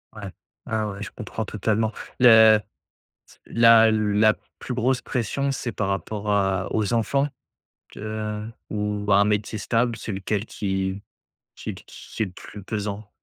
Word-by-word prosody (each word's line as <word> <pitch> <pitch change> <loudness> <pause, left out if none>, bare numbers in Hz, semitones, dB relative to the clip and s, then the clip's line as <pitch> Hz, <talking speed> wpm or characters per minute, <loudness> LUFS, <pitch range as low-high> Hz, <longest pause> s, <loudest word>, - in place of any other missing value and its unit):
Ouais. 105 -2 -7 0.4
Ah 110 -1 -1
ouais, 100 0 -7
je - - -6
comprends 110 -1 -5
totalement. 110 +2 0 0.3
Le 110 -3 +8 0.5
ts - - -21
la 115 -1 +7
la 110 0 +3 0.3
plus 130 - -5
grosse 125 +1 +1
pression, 135 +4 -1
c'est 125 -3 -3
par 100 -2 -2
rapport 105 +1 -2
à 95 -1 +1
aux 110 0 0
enfants? 135 +5 +1 0.7
Te 105 0 -4 0.2
ou 105 -1 -2
à 100 - +7
un - - +5
métier 105 +1 -1
stable? 115 +3 0
C'est 110 - -6
lequel 100 +2 -2
qui 95 -1 -3 0.5
qui - - -6
qu - - -13
qui - - -6
est - - 0
le 95 - -9
plus 100 +2 -11
pesant? 105 0 -4
105 Hz, 160 wpm, -24 LUFS, 100-115 Hz, 0.7 s, Le